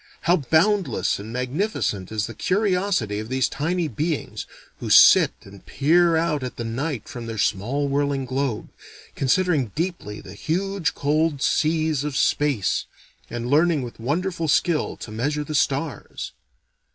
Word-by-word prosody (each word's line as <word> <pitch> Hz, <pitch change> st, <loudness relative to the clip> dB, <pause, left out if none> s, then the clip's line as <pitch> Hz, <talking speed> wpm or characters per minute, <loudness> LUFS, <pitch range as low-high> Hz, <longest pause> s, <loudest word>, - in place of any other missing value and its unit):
How 175 Hz, +2 st, +3 dB
boundless 160 Hz, -, +1 dB
and 105 Hz, +3 st, -8 dB
magnificent 125 Hz, -, -2 dB
is 110 Hz, -1 st, -1 dB
the 115 Hz, -, -7 dB
curiosity 185 Hz, -, 0 dB
of 110 Hz, +1 st, -6 dB
these 130 Hz, -1 st, +1 dB
tiny 170 Hz, +3 st, -1 dB
beings, 150 Hz, +4 st, -3 dB, 0.3 s
who -, -, -5 dB
sit -, -, +8 dB
and 100 Hz, 0 st, -14 dB
peer 170 Hz, +4 st, +3 dB
out 160 Hz, -3 st, +1 dB
at 125 Hz, -2 st, -5 dB
the 120 Hz, -, -5 dB
night 125 Hz, +2 st, -3 dB
from 120 Hz, -2 st, -7 dB
their 115 Hz, -1 st, -5 dB
small 120 Hz, +9 st, 0 dB
whirling 140 Hz, -1 st, 0 dB
globe, 130 Hz, -3 st, -2 dB, 0.4 s
considering 140 Hz, -, +1 dB
deeply 165 Hz, -, -3 dB
the 95 Hz, -, -11 dB
huge 185 Hz, -, -2 dB
cold 150 Hz, +1 st, +1 dB
seas 155 Hz, -2 st, +1 dB
of 145 Hz, -2 st, -3 dB
space, 145 Hz, -9 st, +1 dB, 0.4 s
and 120 Hz, 0 st, -4 dB
learning 155 Hz, +1 st, +3 dB
with 120 Hz, -2 st, -8 dB
wonderful 165 Hz, +7 st, -1 dB
skill 155 Hz, +1 st, +1 dB
to 110 Hz, -, -9 dB
measure 145 Hz, +7 st, -1 dB
the 155 Hz, -, -6 dB
stars. 140 Hz, 0 st, -2 dB
145 Hz, 145 wpm, -23 LUFS, 120-165 Hz, 0.4 s, sit